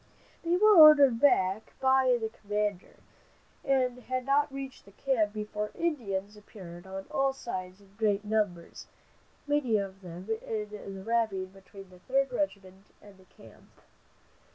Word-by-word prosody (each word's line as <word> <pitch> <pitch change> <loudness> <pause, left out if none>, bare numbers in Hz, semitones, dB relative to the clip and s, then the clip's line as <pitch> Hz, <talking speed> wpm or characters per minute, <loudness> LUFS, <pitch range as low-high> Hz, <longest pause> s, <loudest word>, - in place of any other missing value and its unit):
They 340 +1 +1
were 425 +2 +6
ordered 290 -7 +8
back 220 -7 +2
by 260 -1 +3
the 220 -1 -3
commander, 210 -3 -4 0.7
and 255 -2 +1
had 255 0 -4
not 285 +1 +2
reached 270 -5 -8
camp 230 -7 +1
before 210 0 -4
Indians 210 - -3
appeared 185 -4 -12
on 190 0 -7
all 270 0 +1
sides 185 -7 -7
in 195 -1 -22
great 210 -2 +1
numbers, 205 -6 -2 0.6
many 290 -6 +1
of 195 -1 -5
them 180 +1 -10
in 210 -1 -4 0.3
the 190 - -9
ravine 215 -4 -1
between 195 0 -14
the 180 - -16
Third 270 +6 0
Regiment 200 -8 -4
and 200 -2 -17
the 190 - -20
camp. 115 - -19
215 Hz, 140 wpm, -29 LUFS, 195-265 Hz, 0.7 s, ordered